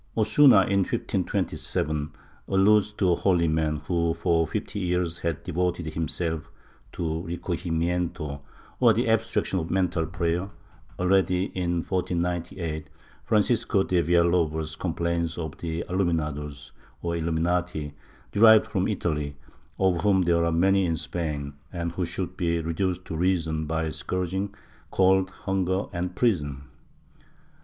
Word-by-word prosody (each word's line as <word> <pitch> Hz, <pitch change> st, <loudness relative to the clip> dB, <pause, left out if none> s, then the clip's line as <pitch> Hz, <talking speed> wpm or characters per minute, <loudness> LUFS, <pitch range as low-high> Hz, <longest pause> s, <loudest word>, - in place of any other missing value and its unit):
Osuna, 110 Hz, 0 st, +6 dB
in 100 Hz, +1 st, +1 dB
1527, 75 Hz, -5 st, -1 dB, 0.4 s
alludes 105 Hz, +2 st, +4 dB
to 95 Hz, -3 st, +1 dB
a -, -, +4 dB
holy 90 Hz, -3 st, +2 dB
man 80 Hz, -1 st, +1 dB
who 85 Hz, -1 st, +1 dB
for 85 Hz, -1 st, +1 dB
fifty 105 Hz, -, -4 dB
years 90 Hz, -2 st, -1 dB
had 85 Hz, -3 st, -2 dB
devoted 90 Hz, -1 st, -1 dB
himself 80 Hz, 0 st, -2 dB, 0.4 s
to 80 Hz, -1 st, -3 dB
recojimieyito, 85 Hz, -3 st, -2 dB, 0.4 s
or 120 Hz, -3 st, +6 dB
the 115 Hz, +3 st, 0 dB
abstraction 115 Hz, -3 st, +1 dB
of 80 Hz, -, -4 dB
mental 90 Hz, -3 st, 0 dB
prayer, 85 Hz, 0 st, -1 dB
and -, -, -11 dB, 0.5 s
already, 90 Hz, 0 st, +2 dB
in 85 Hz, -2 st, -1 dB
1498, 85 Hz, -3 st, -2 dB, 0.4 s
Francisco 110 Hz, -2 st, +2 dB
de 90 Hz, -2 st, +2 dB
Villalobos 85 Hz, -2 st, +2 dB
complains 85 Hz, -1 st, -2 dB
of 80 Hz, -3 st, -4 dB
the 85 Hz, 0 st, -3 dB
Aluminados 75 Hz, -6 st, -2 dB, 0.3 s
or 85 Hz, 0 st, -1 dB
Illuminati, 85 Hz, -2 st, -1 dB, 0.4 s
derived 110 Hz, +1 st, +7 dB
from 95 Hz, -3 st, -1 dB
Italy, 75 Hz, -8 st, -2 dB, 0.4 s
of 95 Hz, -3 st, +2 dB
whom 95 Hz, -3 st, +3 dB
there 85 Hz, -1 st, +3 dB
were 85 Hz, 0 st, +1 dB
many 95 Hz, +4 st, +3 dB
in 80 Hz, -1 st, 0 dB
Spain, 75 Hz, -4 st, -3 dB, 0.2 s
and 85 Hz, -2 st, -3 dB
who 85 Hz, 0 st, -2 dB
should 90 Hz, +1 st, -4 dB
be 85 Hz, -2 st, 0 dB
reduced 90 Hz, +2 st, -2 dB
to 80 Hz, -, -5 dB
reason 80 Hz, -3 st, 0 dB
by 80 Hz, +1 st, -1 dB
scourging, 90 Hz, +5 st, -2 dB, 0.4 s
cold, 95 Hz, 0 st, +3 dB, 0.2 s
hunger 95 Hz, 0 st, 0 dB
and 90 Hz, 0 st, -3 dB
prison. 75 Hz, -, 0 dB
85 Hz, 130 wpm, -26 LUFS, 80-95 Hz, 0.5 s, derived